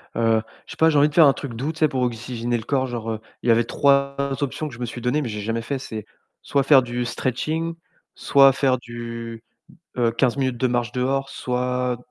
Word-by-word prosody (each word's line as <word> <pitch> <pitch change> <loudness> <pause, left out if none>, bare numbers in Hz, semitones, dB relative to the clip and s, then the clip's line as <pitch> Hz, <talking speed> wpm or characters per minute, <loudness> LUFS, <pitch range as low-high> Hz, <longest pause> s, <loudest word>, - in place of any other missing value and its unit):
heu, 115 -1 +2 0.2
je - - -12
sais - - -9
pas, 160 0 +5
j'ai 150 - +2
envie 145 +1 +5
de 150 - -14
faire 165 -1 +7
un 140 - +5
truc 135 -2 -7
doux. 140 +7 -2
Tu 160 - -13
sais 155 - +5
pour 130 -3 -2
oxygéner 120 0 -2
le 110 - -6
corps 130 0 0
genre, 115 -2 -4
heu, 110 - -4 0.2
il 120 - 0
y - - +8
avait 115 0 +3
3 140 0 +2 0.3
options 145 +2 -2
que - - -13
je 120 - -11
me 120 - -2
suis 120 +1 -7
données, 125 +6 +1
mais 120 - -3
j'ai 105 -1 -4
jamais 115 +2 -2
fait. 135 +3 -3
C'est 110 -5 -7 0.4
soit 140 -1 +1
faire 135 -1 +6
du 120 0 -3
stretching, 155 +8 -2 0.4
soit 135 -1 +5
faire 130 -1 +2
du, 115 -1 -7 0.5
heu, 120 -2 +2
15 120 +2 +1
minutes 130 -3 0
de 130 +2 +1
marche 120 -1 -1
dehors, 135 +2 -1
soit 125 0 -2
125 Hz, 240 wpm, -23 LUFS, 115-140 Hz, 0.5 s, y